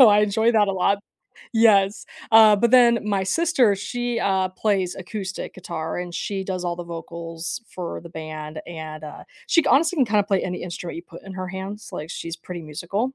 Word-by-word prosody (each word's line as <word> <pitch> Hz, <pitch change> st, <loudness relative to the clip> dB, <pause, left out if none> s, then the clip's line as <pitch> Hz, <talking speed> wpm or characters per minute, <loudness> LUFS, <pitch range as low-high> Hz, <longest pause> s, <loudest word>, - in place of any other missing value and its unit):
So, 250 Hz, -, +10 dB
I 205 Hz, 0 st, +6 dB
enjoy 220 Hz, +3 st, +2 dB
that 210 Hz, -3 st, +4 dB
a -, -, +1 dB
lot. 195 Hz, +2 st, +2 dB, 0.6 s
Yes. 210 Hz, -3 st, +4 dB, 0.3 s
Uh, 220 Hz, -1 st, +8 dB
but 235 Hz, +3 st, +2 dB
then 240 Hz, -2 st, +6 dB
my 200 Hz, -2 st, +1 dB
sister, 265 Hz, -, +3 dB
she, 240 Hz, +4 st, -2 dB
uh, 190 Hz, -3 st, +1 dB
plays 190 Hz, -2 st, 0 dB
acoustic 190 Hz, +1 st, -5 dB
guitar 170 Hz, -3 st, -5 dB
and 175 Hz, -1 st, -5 dB
she 195 Hz, +1 st, -3 dB
does 185 Hz, -1 st, -3 dB
all 175 Hz, -1 st, -1 dB
the 175 Hz, -, -6 dB
vocals 170 Hz, +3 st, -6 dB
for 180 Hz, -2 st, -6 dB
the 170 Hz, -, -11 dB
band 155 Hz, -1 st, -7 dB
and, 155 Hz, -2 st, -7 dB
uh, 150 Hz, -, -8 dB, 0.2 s
she 330 Hz, -, +5 dB
c -, -, -8 dB
honestly 325 Hz, +5 st, +4 dB
can 265 Hz, -, +4 dB
kinda 210 Hz, -2 st, +2 dB
play 195 Hz, -1 st, +1 dB
any 180 Hz, -1 st, -4 dB
instrument 175 Hz, -1 st, -6 dB
you 170 Hz, -, -7 dB
put -, -, -13 dB
in 195 Hz, -, -9 dB
her 185 Hz, 0 st, -4 dB
hands; 190 Hz, +3 st, -6 dB
like, 155 Hz, -, -6 dB
she's 165 Hz, -1 st, -5 dB
pretty 175 Hz, +1 st, -7 dB
musical. 175 Hz, -, -3 dB
190 Hz, 205 wpm, -23 LUFS, 170-215 Hz, 0.6 s, So